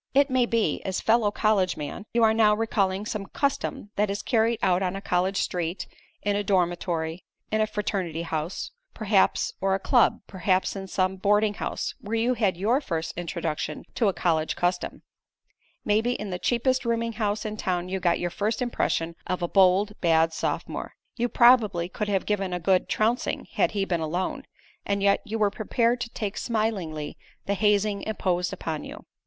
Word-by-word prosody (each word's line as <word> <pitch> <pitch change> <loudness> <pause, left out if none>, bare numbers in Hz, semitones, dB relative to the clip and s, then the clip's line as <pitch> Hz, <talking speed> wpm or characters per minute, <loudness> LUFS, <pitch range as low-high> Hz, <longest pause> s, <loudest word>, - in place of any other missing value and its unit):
It 280 0 +4
may 255 -2 +3
be, 225 -10 +1
as 190 -1 -2
fellow 225 -1 +3
college 205 -3 +1
man, 150 +7 -6
you 235 0 +2
are 220 0 +5
now 215 -1 +4
recalling 205 -3 0
some 210 -2 -4
custom 275 -7 -2
that 210 0 +2
is 200 +1 -3
carried 230 -1 +2
out 180 0 +3
on 185 0 -1
a - - -3
college 190 0 0
street, 175 0 -2 0.4
in 205 0 +1
a 205 - 0
dormitory, 175 -3 0 0.3
in 215 0 +2
a 215 - +2
fraternity 185 -6 -2
house, 160 +1 -3 0.2
perhaps, 215 -3 +2
or 190 0 +2
a - - -2
club; 240 +4 +3
perhaps 185 0 0
in 195 -1 -6
some 185 0 0
boarding 210 +2 +2
house, - - -3
where 215 +2 -3
you 235 +3 +2
had 205 -7 +1
your 230 +9 +2
first 165 - -3
introduction 170 -2 -3
to 230 - +1
a 195 - +2
college 160 -3 0
custom; 175 0 -1 0.8
maybe 220 +3 +2
in 210 -4 -5
the 180 - -3
cheapest 255 +4 +1
rooming 230 -1 -1
house 210 -1 -1
in 215 0 -3
town 180 -3 -2
you 190 +1 -2
got 175 -2 +2
your 175 0 -2
first 210 +4 -1
impression 170 -9 -1
of 185 -1 -2
a - - +1
bold, 195 +2 +4
bad 165 -1 +3
sophomore. - - -3 0.2
You 240 0 0
probably 220 -8 +5
could 210 +2 -3
have 195 -2 0
given 195 -3 -1
him - - 0
a - - -7
good 185 +2 +2
trouncing 230 +4 0
had - - +2
he 200 -2 0
been 175 -3 -1
alone, 175 +4 -2 0.4
and 200 0 -1
yet 200 0 +4
you 220 +2 -3
were 210 -2 +2
prepared 235 +3 0
to 235 - -3
take 210 -3 -4
smilingly 195 -10 -2 0.3
the 200 - 0
hazing 205 0 +2
imposed 180 -4 -1
upon 155 -2 -4
you. - - -10
200 Hz, 185 wpm, -26 LUFS, 180-220 Hz, 0.8 s, are